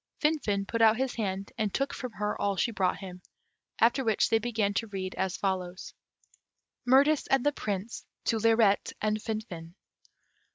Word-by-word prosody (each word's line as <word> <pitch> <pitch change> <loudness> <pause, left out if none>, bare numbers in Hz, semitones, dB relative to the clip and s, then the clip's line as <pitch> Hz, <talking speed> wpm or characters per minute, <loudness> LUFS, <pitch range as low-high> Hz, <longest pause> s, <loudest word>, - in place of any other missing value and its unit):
Finfin 220 -11 0
put 230 - -1
out 220 0 +6
his 265 0 -1
hand 195 -3 -3
and 215 -2 0
took 275 +1 -1
from 250 -3 -6
her 210 -1 -2
all 200 -1 +1
she 230 - 0
brought 190 -4 0
him, 185 -2 -9 0.6
after 240 +4 +3
which 220 -2 +2
they 225 - +4
began 220 -4 0
to 225 +3 -1
read 190 -2 -4
as 190 0 -2
follows: 185 -2 -3 1.0
_Mirtis 280 +3 +5
and 270 -1 +2
the 290 - +4
Prince 210 -4 -4 0.2
to 225 - +1
Lirette 225 -2 +3
and 215 0 0
Finfin. 185 -7 -6
215 Hz, 165 wpm, -29 LUFS, 195-235 Hz, 1.0 s, out